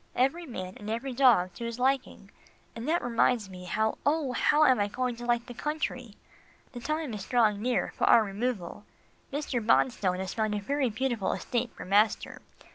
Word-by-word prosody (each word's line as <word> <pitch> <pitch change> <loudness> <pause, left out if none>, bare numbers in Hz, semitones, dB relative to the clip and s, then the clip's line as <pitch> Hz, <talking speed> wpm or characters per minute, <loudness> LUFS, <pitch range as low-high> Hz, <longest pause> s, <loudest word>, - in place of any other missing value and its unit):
Every 295 +7 +1
man 185 -7 -6
and 210 - -8
every 240 +4 -3
dog 235 -9 +4
to - - -8
his 235 0 -4
liking, 260 -6 -1 0.4
and 230 +5 -5
that 340 +2 +1
reminds 230 -3 +1
me, 180 -1 -9
how, 220 +4 -1
oh! 290 -2 +1
how 295 +5 +3
am 260 -4 +4
I 205 - +2
going 250 +3 -2
to 240 0 -7
like 240 0 +1
the 245 - -9
country? 255 -5 -4 0.6
The 245 - -7
time 305 +1 -3
is 205 -2 -6
drawing 220 -5 +2
near 250 +2 0
for - - +1
our 230 - +6
removal. 205 -2 -3 0.5
Mr. 275 -4 -2
Bonstone 210 -5 +2
has 190 0 -4
found 215 -2 -1
a - - -1 0.3
beautiful 230 -4 -1
estate 240 - -2
for - - -8
master. 205 +3 +1
235 Hz, 185 wpm, -28 LUFS, 210-260 Hz, 0.6 s, our